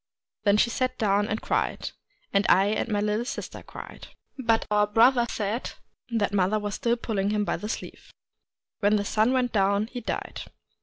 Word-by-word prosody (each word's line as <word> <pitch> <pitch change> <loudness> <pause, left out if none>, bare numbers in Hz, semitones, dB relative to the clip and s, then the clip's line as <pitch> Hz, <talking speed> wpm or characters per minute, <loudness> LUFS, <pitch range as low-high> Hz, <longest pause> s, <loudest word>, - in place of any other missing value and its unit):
Then 200 0 +5
she 235 +2 +3
sat 255 +1 -1
down 205 -1 +2
and 215 +1 -3
cried; - - -1 0.4
and 200 0 +4
I 195 +2 +5
and 215 +2 -1
my 205 -2 +1
little 210 +2 0
sister 245 - -6
cried. - - -10 0.3
But 230 -4 +1
our 210 0 +4
brother 235 +3 +4
said 215 +3 -3 0.4
that 215 -4 0
mother 195 +2 +2
was 205 -1 -3
still 235 +3 +1
pulling 205 -4 -1
him 210 0 0
by - - -1
the 210 - -6
sleeve. - - -7 0.7
When 205 +1 +3
the 205 -1 0
sun 215 +4 +2
went 255 -2 +1
down, 200 0 +2
he 245 - -4
died. - - -4
210 Hz, 185 wpm, -26 LUFS, 205-235 Hz, 0.7 s, Then